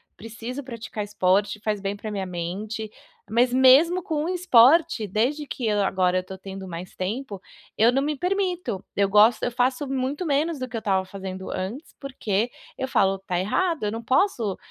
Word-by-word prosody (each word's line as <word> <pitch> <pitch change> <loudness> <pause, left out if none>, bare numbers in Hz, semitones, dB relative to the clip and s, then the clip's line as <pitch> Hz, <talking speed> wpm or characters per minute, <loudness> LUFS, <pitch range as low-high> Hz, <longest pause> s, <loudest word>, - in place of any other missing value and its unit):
preciso 230 +5 -7
praticar 230 -4 -6
esporte, 200 +1 +1
faz 210 -1 -1
bem 195 +1 -3
para 215 +1 -7
a - - -6
minha 195 -2 -3
mente, 195 +5 -5 0.4
mas 245 +2 +2
mesmo 280 +8 +6
com 305 -3 -2
um - - -2
esporte, 325 - +4
desde 255 +10 -1
que, 240 -5 -2
eh, - - +2
agora 185 -2 +1
eu 185 - -1
tô 190 0 -8
tendo 190 0 -8
mais 175 +1 -7
tempo, 205 +1 -4 0.4
eu 225 +2 +5
não 270 +2 +1
me 295 +1 -1
permito. 360 - -1
Eu 200 0 +3
gosto 210 +3 +5
eu 245 - 0
faço 250 +3 0
muito 270 +5 -2
menos 300 +1 0
do 255 - -3
que 245 - -9
eu 225 - -2
tava 190 -3 +1
fazendo 190 -1 -7
antes, 220 - -5
porque 240 -5 -2 0.3
eu 265 - -2
falo: 195 -6 +2
"Tá 185 -2 -2
errado, 325 - 0
eu 205 - 0
não 230 +1 -5
posso, 245 - +1
225 Hz, 190 wpm, -24 LUFS, 195-270 Hz, 0.4 s, mesmo